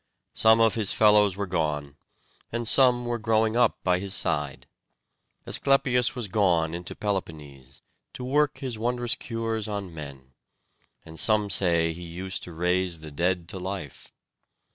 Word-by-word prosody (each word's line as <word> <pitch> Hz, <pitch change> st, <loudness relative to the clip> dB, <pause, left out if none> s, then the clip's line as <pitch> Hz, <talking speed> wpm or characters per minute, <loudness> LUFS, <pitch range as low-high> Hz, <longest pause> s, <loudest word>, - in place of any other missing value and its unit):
Some 110 Hz, 0 st, +4 dB
of 115 Hz, -1 st, +4 dB
his 110 Hz, -4 st, 0 dB
fellows 105 Hz, -3 st, +4 dB
were 100 Hz, -, -2 dB
gone, 75 Hz, -6 st, -2 dB, 0.6 s
and 120 Hz, 0 st, -3 dB
some 125 Hz, -1 st, +5 dB
were 120 Hz, 0 st, -2 dB
growing 110 Hz, 0 st, +1 dB
up 120 Hz, -2 st, +2 dB
by 90 Hz, -1 st, +1 dB
his 100 Hz, 0 st, 0 dB
side. 70 Hz, -2 st, -1 dB, 0.8 s
Asclepius 130 Hz, -3 st, +2 dB
was 120 Hz, -4 st, -3 dB
gone 90 Hz, -5 st, +1 dB
into 85 Hz, +1 st, -6 dB
Peloponnese, 75 Hz, -10 st, -6 dB, 0.3 s
to 125 Hz, -, -8 dB
work 145 Hz, +2 st, +1 dB
his 125 Hz, -5 st, -5 dB
wondrous 120 Hz, +1 st, -1 dB
cures 115 Hz, -3 st, -3 dB
on 100 Hz, -4 st, -5 dB
men; 70 Hz, -4 st, -10 dB, 0.7 s
and 80 Hz, 0 st, -8 dB
some 105 Hz, -2 st, +3 dB
say 85 Hz, -3 st, +2 dB
he 85 Hz, -, -11 dB
used 90 Hz, +2 st, -5 dB
to 90 Hz, -, -10 dB
raise 90 Hz, 0 st, -1 dB
the 80 Hz, -1 st, -9 dB
dead 85 Hz, +3 st, -1 dB
to 95 Hz, -, -5 dB
life. 95 Hz, -6 st, -7 dB
95 Hz, 150 wpm, -26 LUFS, 85-115 Hz, 0.8 s, some